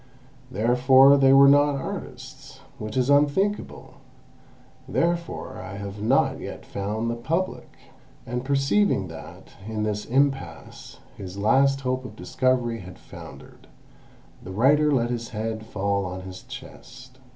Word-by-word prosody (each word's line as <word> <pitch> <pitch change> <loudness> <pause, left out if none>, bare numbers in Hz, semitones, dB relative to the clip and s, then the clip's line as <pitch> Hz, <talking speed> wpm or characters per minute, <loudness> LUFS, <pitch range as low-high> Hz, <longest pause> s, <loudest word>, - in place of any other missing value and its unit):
Therefore 130 +4 +5
they 135 -1 +5
were 135 0 +8
not 145 +1 +5
artists, 135 - -8 0.2
which 110 +3 -5
is 130 +2 +2
unthinkable; 150 +9 0 0.9
therefore 170 0 -2
I 95 +2 -8
have 100 0 -7
not 125 +6 +2
yet - - -8
found 105 +3 -3
the 115 - -1
Public!" 165 +10 -3 0.6
And 125 +1 -4
perceiving 135 - +1
that 80 - -11 0.2
in 110 -1 -3
this 105 -1 -2
impasse 135 - -2 0.2
his 95 -1 -8
last 135 +6 +3
hope 130 0 -2
of 125 - -10
discovery 125 -3 0
had 90 -1 -11
foundered, - - -13 0.7
the 95 - -9
writer 145 +9 +3
let 120 -3 +1
his 115 -1 -4
head 110 0 -5
fall 100 -1 -1
on 90 0 -6
his 95 0 -9
chest. 130 0 -12
125 Hz, 130 wpm, -24 LUFS, 105-135 Hz, 0.9 s, were